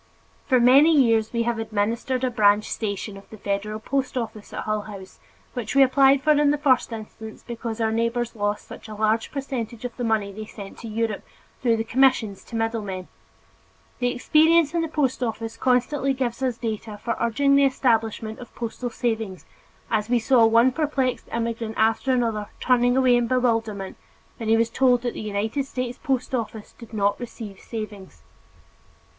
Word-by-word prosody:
For 255 -3 +4
many 280 +6 +6
years 225 -4 +3
we 235 -1 0
have 235 -1 -1
administered 225 +4 -1
a 255 - +1
branch 210 -2 +3
station 205 -1 -3
of 195 - -15
the 220 - -11
federal 205 +2 -3
post 260 +3 -2
office 225 -3 -5
at - - -4
Hull 215 -1 -1
House, 195 -2 -10 0.3
which 240 -1 -4
we 275 - +8
applied 270 +1 +4
for 310 - +4
in 295 -1 +4
the 295 - +2
first 265 -4 +2
instance 220 0 -9
because 230 -1 -5
our 220 -1 +1
neighbors 230 +1 -1
lost 205 0 -2
such - - -10
a 215 - -8
large 220 +1 0
percentage 250 -4 -5
of 245 - -5
the 245 - -3
money 220 -3 0
they 215 +2 -8
sent 200 -3 -10
to 230 - -8
Europe, 220 -1 -2 0.4
through 235 -3 +2
the 225 - -1
commissions 230 -4 +2
to 235 - -9
middle 225 0 -1
men. 185 -3 -6 0.9
The 245 - +1
experience 310 +5 +4
in 340 - +1
the 325 - -1
post 285 -5 -1
office 225 -1 -3
constantly 265 +3 +1
gave 250 -1 -2
us 255 -3 0
data 220 -2 -4
for 235 - -1
urging 250 +5 +2
the 280 0 +5
establishment 225 -4 0
of 245 - -12
postal 240 +1 -4
savings 225 -5 -3 0.5
as 215 -1 0
we 245 - +3
saw 235 0 +4
one 230 +3 +5
perplexed 275 -3 -1
immigrant 230 -1 -3
after 225 +4 +2
another 225 -5 0
turning 245 0 +3
away 255 -2 +5
in 240 -1 +1
bewilderment 225 -6 0 0.4
when 225 -2 -4
he 225 - +5
was 230 0 +1
told 250 -1 +3
that 240 - -2
the - - -6
United 215 +6 -2
States 250 -2 -4
post 265 -4 -1
office 225 -3 -4
did 230 -3 -12
not 205 -2 0
receive 225 -5 -8
savings. 210 -4 -8
230 Hz, 185 wpm, -24 LUFS, 220-255 Hz, 0.9 s, we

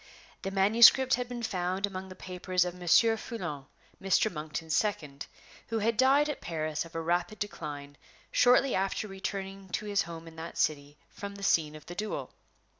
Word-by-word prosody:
The 195 - -3
manuscript 225 +7 +6
had 245 0 0
been 240 -1 -5
found 185 -1 -1
among 190 -1 -7
the 185 - -10
papers 180 0 -1
of 180 - -3
Monsieur 180 +6 +4
Foulon, 170 - -6 0.3
Mr. 195 +2 +2
Monkton's 155 +1 -3
second, 155 -10 -2 0.4
who 225 - -2
had 225 +1 +1
died 270 +5 +4
at 295 - -4
Paris 155 -1 -3
of 165 - -14
a 165 - -1
rapid 175 +5 -1
decline 145 -8 -6 0.3
shortly 250 +2 +4
after 195 +3 -1
returning 195 0 -5
to 210 - -2
his 205 -1 +1
home 165 -1 -7
in 160 0 -12
that 165 +1 -7
city 145 -1 -1
from 200 0 -7
the 200 - -9
scene 155 -5 +2
of 155 -1 -12
the 175 - -8
duel. 210 +4 -4
190 Hz, 180 wpm, -30 LUFS, 165-210 Hz, 0.4 s, manuscript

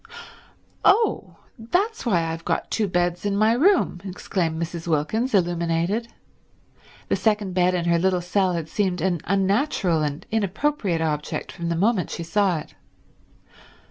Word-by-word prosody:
"Oh 440 +3 +2 0.2
that's 360 - -1
why 175 -7 +2
I've 165 0 -4
got - - -2
two 215 -2 +1
beds 175 -1 0
in 205 -1 0
my 215 +2 +4
room!" 310 - +2
exclaimed 180 -4 -2
Mrs. 170 0 -5
Wilkins, 210 - 0
illuminated; 175 +4 0 1.0
the - - +1
second 210 -4 0
bed 180 0 +2
in 175 -1 -1
her 170 0 +3
little 185 0 +2
cell 180 +1 +1
had 165 -2 -3
seemed 185 +1 -1
an 175 0 0
unnatural 195 - +1
and 150 -1 -3
inappropriate 210 - 0
object 150 -2 -2
from 170 0 -5
the 170 - 0
moment 195 +1 +1
she 170 - -5
saw 185 +1 +1
it. 150 - -9
180 Hz, 145 wpm, -23 LUFS, 170-210 Hz, 1.0 s, my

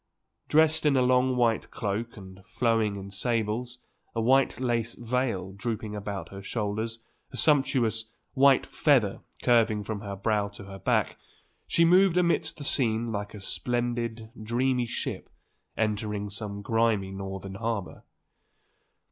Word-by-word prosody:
Dressed 155 0 +4
in 145 -3 +3
a 130 - +4
long 125 0 +3
white 115 -3 +1
cloak 115 +1 -3
and 95 -1 -12
flowing 115 -2 +1
in 100 0 -8
sables, 115 +3 -1 0.4
a - - 0
white 130 +4 +3
lace 120 -2 -1
veil 120 -6 -2
drooping 110 0 -4
about 100 -4 -5
her 100 0 -9
shoulders, 110 +2 -3 0.3
a - - -6
sumptuous 125 -7 +3 0.3
white 135 -1 +5
feather 125 -10 +2 0.2
curving 115 -4 +3
from 105 0 -4
her 100 -2 -5
brow 105 +1 0
to 100 0 -9
her 95 0 -9
back, - - 0 0.5
she 170 - +3
moved 180 +1 +5
amidst 170 -1 +2
the 145 - -5
scene 115 -4 +1
like 105 0 -4
a - - -8
splendid, 120 +1 -2
dreamy 125 +2 0
ship - - -4 0.5
entering 105 -1 -1
some 100 0 -5
grimy 115 -3 +1
Northern 95 0 -6
harbour. 110 -2 -3
115 Hz, 140 wpm, -27 LUFS, 100-125 Hz, 0.5 s, white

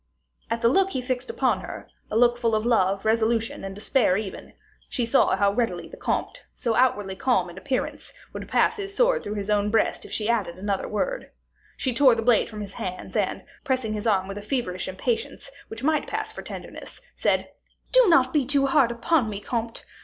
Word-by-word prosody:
At 230 0 -2
the - - +6
look 385 +10 +3
he 265 - -2
fixed 250 - -3
upon 465 - +1
her, - - -8 0.2
a 215 - 0
look 240 0 +5
full 230 -2 +1
of 215 +1 -1
love, 195 -4 +2
resolution, 225 +1 +1
and 195 0 -6
despair, 210 -2 +2
even, 205 -2 -6 0.4
she 250 - -1
knew 235 +4 +4
how 200 -1 +2
readily 225 -7 -1
the - - -11
comte, - - -3
so 235 -3 -1
outwardly 225 -6 +1
calm 190 -6 +1
in 175 - -14
appearance, 260 +3 -3 0.2
would - - -6
pass 455 - +2
his 400 -1 -6
sword - - +3
through 205 - -4
his 205 0 -3
own 205 0 +2
breast 220 0 +1
if - - -11
she 215 - -1
added 210 -7 0
another 200 0 -2
word. - - -2 0.5
She 260 - 0
tore 255 -1 +5
the 225 - -2
blade 235 -2 +3
from 215 -1 -7
his 200 -1 -7
hands, 185 0 -6
and, - - -1 0.2
pressing 255 -5 -1
his 210 +1 -3
arm 190 -3 +2
with 195 +1 -6
a - - -8
feverish 210 -6 -2
impatience, 230 - -3 0.2
which 225 +2 -8
might 310 +1 +1
pass - - -3
for - - -8
tenderness, - - -9
said, - - 0 0.4
"Do - - +6
not 260 -6 +4
be 300 -3 +3
too 275 +1 +2
hard 270 -3 +4
upon 235 +1 +1
me, 200 -2 -4
comte. 230 +1 -4
230 Hz, 205 wpm, -25 LUFS, 205-260 Hz, 0.5 s, the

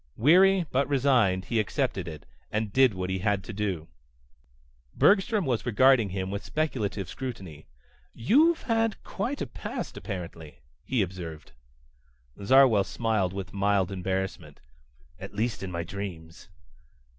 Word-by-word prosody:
Weary 185 +7 +5
but 135 +2 +1
resigned 125 -9 +2
he 115 - 0
accepted 95 -3 -1
it, 75 -6 -8 0.3
and 105 -1 -2
did 130 -5 +4
what 95 0 -3
he 95 - -1
had 100 0 0
to 115 - -8
do... 95 -6 -3 1.1
Bergstrom 205 0 +3
was 120 -4 0
regarding 120 -1 +4
him 95 0 -4
with 100 0 -4
speculative 110 - -2
scrutiny. 95 - -7 0.4
"You've 310 - +3
had 225 -2 0
quite 250 +8 -3
a - - -3
past, - - -6
apparently," 85 -6 -7 0.3
he 125 -6 +1
observed. 85 -4 -8 0.9
Zarwell 125 -2 +5
smiled 110 -4 -1
with 95 0 -6
mild 100 -1 +1
embarrassment. 95 -5 -4 0.6
"At - - -9
least 110 -1 -1
in 95 - -4
my 85 -1 -3
dreams." 85 -3 -8
100 Hz, 135 wpm, -27 LUFS, 95-130 Hz, 1.1 s, Weary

